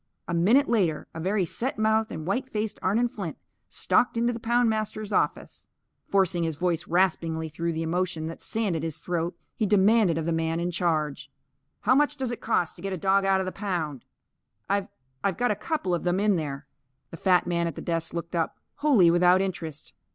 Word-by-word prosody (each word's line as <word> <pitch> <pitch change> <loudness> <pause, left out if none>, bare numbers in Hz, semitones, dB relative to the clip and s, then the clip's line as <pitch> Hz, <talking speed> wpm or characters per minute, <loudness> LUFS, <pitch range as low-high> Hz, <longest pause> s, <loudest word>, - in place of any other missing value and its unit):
A 170 - -3
minute 220 +12 +4
later, 185 -10 +1
a 165 - -6
very 190 +3 +1
set 240 - -3
mouthed 220 0 +2
and 155 - -5
white 250 +8 -1
faced 215 -3 -3
Arnon 225 +6 +2
Flint 195 -8 -6 0.3
stalked 240 - +2
into 235 +1 +2
the 230 - -5
poundmaster's 220 -3 0
office. - - -1 0.4
Forcing 190 -3 +2
his 165 -2 -1
voice 175 +1 -1
raspingly 165 -2 +1
through 170 +2 -2
the 160 +1 -2
emotion 170 -1 -1
that 165 +1 -7
sanded 200 -8 -1
his 160 -2 -3
throat, 170 0 -3 0.2
he 215 - 0
demanded 205 -3 +4
of 160 - -2
the 170 - 0
man 165 0 0
in 175 +1 -1
charge: 155 -5 -1 0.5
"How 240 - +4
much 290 +2 +2
does 260 -3 -2
it 240 - -6
cost 180 -7 0
to - - -11
get 195 +1 -3
a - - -2
dog 195 +3 +2
out 190 0 +3
of - - -2
the 185 - -3
pound? 170 - -3 0.6
I've 200 0 0 0.4
I've 195 -3 0
got 245 -1 +2
a - - +1
couple 210 - -2
of 175 - -1
them 180 +1 +1
in 205 -1 +3
there." 145 -4 -4 0.5
The 165 - -8
fat 180 +1 +3
man 170 -1 0
at 165 - -4
the - - -7
desk 165 -1 -1
looked 170 +1 -5
up, 165 -1 -1 0.2
wholly 245 - +5
without 180 +1 +5
interest. 175 -6 -4
180 Hz, 205 wpm, -26 LUFS, 165-215 Hz, 0.6 s, wholly